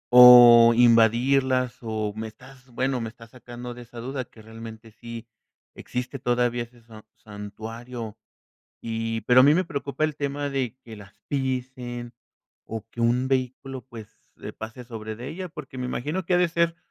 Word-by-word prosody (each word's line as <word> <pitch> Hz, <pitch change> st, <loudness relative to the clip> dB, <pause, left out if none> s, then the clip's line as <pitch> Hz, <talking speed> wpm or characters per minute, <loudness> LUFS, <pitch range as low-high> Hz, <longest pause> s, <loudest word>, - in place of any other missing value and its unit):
o 120 Hz, -1 st, +10 dB
invadirlas?, 125 Hz, +2 st, +3 dB
o, 110 Hz, -2 st, -3 dB
me 110 Hz, 0 st, -5 dB
estás 130 Hz, +3 st, -16 dB
bueno, 130 Hz, +1 st, -1 dB
me 115 Hz, -, -4 dB
estás 115 Hz, 0 st, -16 dB
sacando 120 Hz, -1 st, -9 dB
de 120 Hz, -, -11 dB
esa 120 Hz, 0 st, -14 dB
duda 130 Hz, +1 st, -4 dB
que 110 Hz, -2 st, -18 dB
realmente 115 Hz, 0 st, -11 dB
sí 115 Hz, +1 st, -9 dB, 0.5 s
existe 125 Hz, +2 st, -5 dB
todavía 120 Hz, -1 st, 0 dB
ese 120 Hz, 0 st, -17 dB
san 110 Hz, -2 st, -14 dB
santuario 110 Hz, +2 st, -8 dB, 0.7 s
y, 115 Hz, 0 st, -3 dB
pero 125 Hz, +4 st, +6 dB
a -, -, +8 dB
mí 145 Hz, +3 st, +6 dB
me 185 Hz, +3 st, +2 dB
preocupa 145 Hz, -2 st, -3 dB
el 155 Hz, -1 st, -1 dB
tema 145 Hz, 0 st, -3 dB
de 130 Hz, -3 st, -2 dB
que 115 Hz, -, -10 dB
las 100 Hz, -1 st, -14 dB
pisen 125 Hz, -3 st, -3 dB, 0.5 s
o 110 Hz, -1 st, -6 dB
que 120 Hz, -, -6 dB
un 120 Hz, +2 st, +2 dB
vehículo 130 Hz, 0 st, -2 dB
pues 115 Hz, -5 st, -10 dB, 0.5 s
pase 110 Hz, +3 st, -8 dB
sobre 110 Hz, -2 st, -7 dB
de 120 Hz, +3 st, -7 dB
ella, 180 Hz, +3 st, -6 dB
porque 150 Hz, -5 st, -10 dB
me 125 Hz, -, -3 dB
imagino 150 Hz, +9 st, -3 dB
que 180 Hz, -, +2 dB
ha -, -, +4 dB
de 180 Hz, -, +3 dB
ser 170 Hz, 0 st, 0 dB
120 Hz, 170 wpm, -25 LUFS, 115-130 Hz, 0.7 s, o